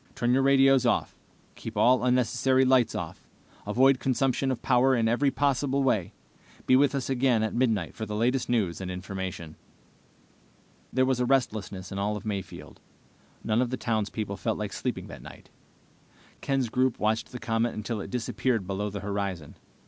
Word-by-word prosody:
Turn 120 0 +1
your 135 - +3
radios 135 -1 +5
off. 120 - 0 0.4
Keep - - -8
all 125 0 +4
unnecessary 125 +1 +2
lights 130 -3 +3
off. - - -6 0.4
Avoid 130 +5 +4
consumption 135 0 0
of 130 -3 -3
power 130 +1 +3
in 115 -2 +1
every 125 +5 +2
possible 140 0 0
way. 110 -9 +1 0.5
Be 130 - +5
with 140 +1 +3
us 135 -2 -2
again 125 -4 +2
at 110 - -2
midnight 110 -8 0
for 110 - -6
the 105 - -4
latest 125 +4 0
news 100 -8 0
and 95 - -5
information." 90 -3 -6 1.3
There 130 0 +2
was 130 -1 0
a 125 - +1
restlessness 105 -8 -1
in 95 - -4
all 105 +1 -1
of 105 - -10
Mayfield. 100 -4 -6 0.6
None 110 +2 +1
of 125 - 0
the 130 - -3
townspeople 110 -3 -2
felt 110 -2 -2
like 105 -2 -4
sleeping - - -3
that - - -10
night. - - -13 0.9
Ken's 135 -3 0
group 130 +1 +1
watched 110 +1 -1
the 125 - -6
comet 115 -1 -1
until 110 0 -4
it - - -7
disappeared 120 -2 -1
below 100 +2 -3
the 100 0 -6
horizon. 100 -6 -4
120 Hz, 170 wpm, -27 LUFS, 105-130 Hz, 1.3 s, radios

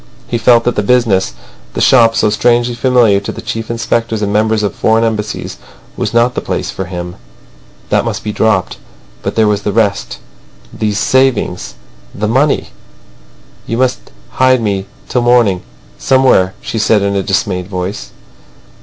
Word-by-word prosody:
He 120 - -2
felt 115 +1 +4
that 120 - 0
the - - +1
business, 100 - +1 0.4
the - - -2
shop 115 -3 +5
so 105 - +2
strangely 120 +2 +2
familiar 120 -4 +3
to 100 - -5
chief 115 0 -5
inspectors 115 -1 -1
and 100 0 -1
members 110 0 +1
of 105 - -1
foreign 110 +1 +2
Embassies, 110 -2 -3 0.4
was - - -2
not 120 +1 +2
the - - -3
place - - -3
for 95 - -5
him. 90 -1 -6 0.7
That - - +3
must - - -4
be 105 - -3
dropped. 105 -5 0 0.4
But - - -4
there 110 -1 +3
was 105 -1 0
the 105 - -2
rest. 100 -2 0 0.6
These 105 -2 -2
savings. 130 -6 0 0.4
The 105 +1 -2
money! 135 +6 +1 1.0
"You 115 - -2
must 130 0 -1 0.3
hide 130 0 +5
me 100 -3 -2 0.2
till 125 - 0
the - - -2
morning 120 -7 +3 0.4
somewhere," 130 -8 +3
she 115 - -4
said 105 -1 +2
in 100 0 0
a 100 - +1
dismayed 95 -2 -1
voice. 90 -9 -5
110 Hz, 165 wpm, -14 LUFS, 100-120 Hz, 1.0 s, shop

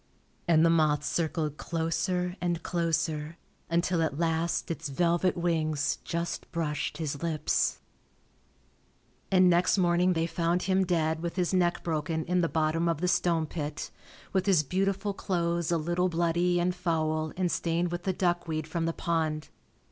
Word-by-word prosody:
And 165 -1 +5
the 165 - +5
moth 155 -3 +3
circled 155 -3 -1
closer 180 +2 -1
and 175 -2 -1
closer 165 -2 -1 0.3
until 170 0 +1
at 155 -3 -1
last 165 +1 0
its 160 -2 -4
velvet 175 +5 +1
wings 155 -4 0
just 170 0 -4
brushed 150 -3 -2
his 150 -3 -3
lips..... 160 -3 0 1.5
And 185 -1 +6
next 180 +2 +3
morning 180 0 +3
they 165 -1 0
found 170 +1 0
him 190 0 +2
dead 160 -2 +1
with 170 0 -3
his 180 0 0
neck 175 -2 +1
broken 160 -1 -2
in 180 +1 +1
the 165 - +1
bottom 160 +1 +1
of 165 -3 -1
the 180 - 0
stone 170 -3 +2
pit, 150 -1 -5 0.4
with 190 0 +1
his 180 -6 +4
beautiful 195 +5 -1
clothes 170 -3 -1
a 170 - +3
little 175 +3 0
bloody 175 +1 +1
and 180 +1 +1
foul 155 -3 -1
and 180 -2 +1
stained 170 +1 0
with 175 0 -3
the 190 - 0
duckweed 175 -4 -1
from 165 +1 -2
the 165 - -1
pond. 160 -3 -1
170 Hz, 155 wpm, -29 LUFS, 160-175 Hz, 1.5 s, And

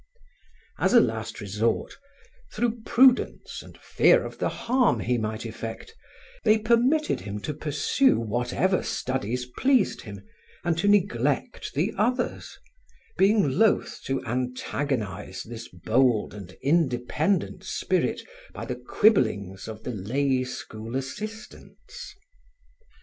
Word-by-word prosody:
As - - +3
a - - +10
last 115 - -1
resort, 105 +2 -1 0.6
through 235 -1 -1
prudence 255 +1 +3
and - - -14
fear - - +3
of - - -8
the - - +1
harm 250 +1 +1
he 120 +1 0
might 110 +1 -3
effect, 115 - -7 0.5
they 215 - +5
permitted 240 +8 +2
him 100 +2 -5
to 150 - -3
pursue 150 - +2
whatever 120 - 0
studies 125 -1 -2
pleased 255 - +1
him 100 -3 -10 0.4
and 175 -1 +1
to 200 - +1
neglect 145 - +1
the 175 +10 0
others, 245 +4 -1 0.6
being 195 -9 +3
loath 220 -1 +2
to 135 -1 -2
antagonize 125 -5 -3
this 115 0 -8
bold 110 +5 +1
and 95 -3 -10
independent 150 +4 +1
spirit - - -1 0.3
by - - -6
the - - -4
quibblings 105 - +1
of 110 -1 -8
the 125 - -3
lay 130 +6 0
school 115 -2 -7
assistants. 215 - -7
130 Hz, 115 wpm, -26 LUFS, -, 0.6 s, a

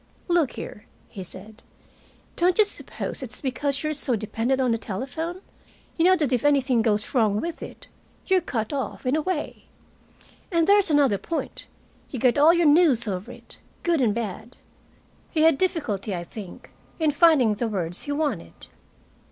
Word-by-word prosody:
"Look 345 -6 +2
here," 210 - -9 0.2
he 190 - -8
said, 210 +5 -11 0.7
"don't 355 +1 +2
you 430 - +6
suppose 405 - -4
it's 250 -1 -6
because 275 +1 -2
you're 305 0 -1
so 275 -4 0
dependent 225 +5 -1
on 255 -2 +2
the 230 - 0
telephone? 275 - -5 0.5
You 330 - +2
know 370 +1 +6
that 295 -7 0
if 245 - +1
anything 270 -4 +3
goes 215 -2 0
wrong 215 -5 +2
with 335 +4 -5
it, - - -9 0.4
you're 375 -2 +3
cut 225 -7 -3
off, 270 -2 -4
in 255 +3 +2
a 310 - +1
way. 340 -2 -4 0.9
And 335 -2 +3
there's 400 0 +4
another 280 -9 +3
point 330 - -5 0.4
you 265 - -5
get 250 +3 +2
all 305 +3 +7
your 340 -1 +2
news 290 -6 +4
over 190 -1 -4
it, - - -15 0.2
good 335 -4 +2
and 220 -4 +2
bad." 225 +1 -5 0.7
He 315 - 0
had 320 -4 +4
difficulty, 225 - -1
I 175 - -4
think, 195 +1 -10 0.3
in 315 -2 +2
finding 290 -7 +4
the 230 +3 -2
words 180 -5 -2
he 290 - -4
wanted. 295 0 -2
270 Hz, 170 wpm, -24 LUFS, 220-320 Hz, 0.9 s, all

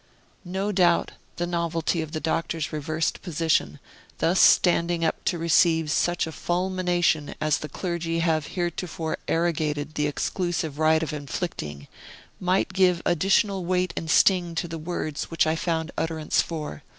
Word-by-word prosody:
No 195 +3 -1
doubt, 175 -3 +3 0.2
the 175 - -2
novelty 170 -1 -1
of 160 -1 -6
the 155 - -3
Doctor's 165 -1 -2
reversed 155 +2 -2
position, 160 - 0 0.4
thus 175 +3 +2
standing 170 -1 +4
up - - -1
to 175 - +1
receive 165 -1 +3
such 175 +2 +1
a 160 - -6
fulmination 175 -3 0
as 155 -1 +1
the 150 - -6
clergy 170 0 -3
have 160 -2 +1
heretofore 170 -2 -2
arrogated 155 -3 0
the 150 -1 0
exclusive 160 0 -2
right 160 0 +3
of 155 - -4
inflicting, 135 - -5 0.5
might 185 +1 +1
give 180 -2 +3
additional 195 +3 +2
weight 180 0 0
and 160 - -4
sting 175 -1 +4
to 175 - -1
the 165 0 -6
words 155 -2 -3
which 165 0 +2
I 160 0 +1
found 165 0 -2
utterance 160 -1 0
for. 155 -2 -6
165 Hz, 150 wpm, -25 LUFS, 155-175 Hz, 0.5 s, standing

